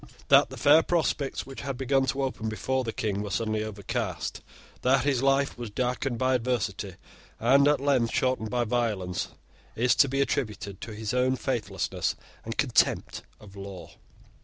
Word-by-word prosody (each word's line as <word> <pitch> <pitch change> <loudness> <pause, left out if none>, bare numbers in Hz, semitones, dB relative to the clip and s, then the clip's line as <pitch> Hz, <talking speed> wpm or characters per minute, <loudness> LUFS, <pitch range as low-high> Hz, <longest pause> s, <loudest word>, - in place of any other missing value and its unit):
That - - +6
the - - -9
fair 150 +2 +6
prospects 160 -5 -1
which 135 0 -8
had 135 -2 -4
begun 135 0 +1
to 135 +1 0
open 110 -4 -2
before 130 +4 -1
the 115 - -3
King 105 -2 -2
were 105 - -4
suddenly 110 +2 -1
overcast, 105 -2 -4 0.4
that 130 +1 +3
his 135 -4 +2
life 135 -1 +2
was 120 -2 -5
darkened 125 +2 -1
by 130 +2 +2
adversity, 110 -6 -1 0.4
and 135 +5 +5
at 150 0 +3
length 130 -4 +2
shortened 130 -4 0
by 125 0 +1
violence, 105 -6 -1 0.5
is 120 +2 +3
to 140 - +5
be 135 +1 -1
attributed 105 -6 -2
to 110 - -7
his 110 +1 -3
own 130 +1 +2
faithlessness - - -2 0.3
and - - -6
contempt - - +2 0.2
of 100 -1 -14
law. 100 -2 -8
125 Hz, 165 wpm, -27 LUFS, 110-135 Hz, 0.5 s, That